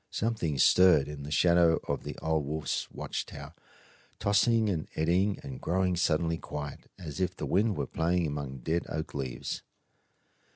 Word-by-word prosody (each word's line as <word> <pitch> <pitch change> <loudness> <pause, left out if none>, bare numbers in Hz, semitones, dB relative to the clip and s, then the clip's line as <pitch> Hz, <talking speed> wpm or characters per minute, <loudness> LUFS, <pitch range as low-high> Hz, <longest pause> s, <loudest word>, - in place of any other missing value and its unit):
Something 105 -10 -1
stirred 90 -1 +6
in 75 -1 -7
the 70 - -7
shadow 85 +1 +4
of - - -2
the - - -6
old 80 -1 +1
wolf's 75 +2 -2
watch - - -4
tower, - - -9 0.6
tossing 110 +2 +3
and 85 -6 -1
eddying 90 +6 +2
and 65 -2 -7
growing 90 +1 +1
suddenly 85 -1 +1
quiet, 75 -1 -7
as 80 -5 -7
if 90 -1 0
the - - -4
wind 105 +1 +2
were - - -1
playing 85 +1 0
among 70 -3 -4
dead 85 +2 -1
oak 80 0 -4
leaves. 65 -3 -4
80 Hz, 160 wpm, -29 LUFS, 75-90 Hz, 0.6 s, stirred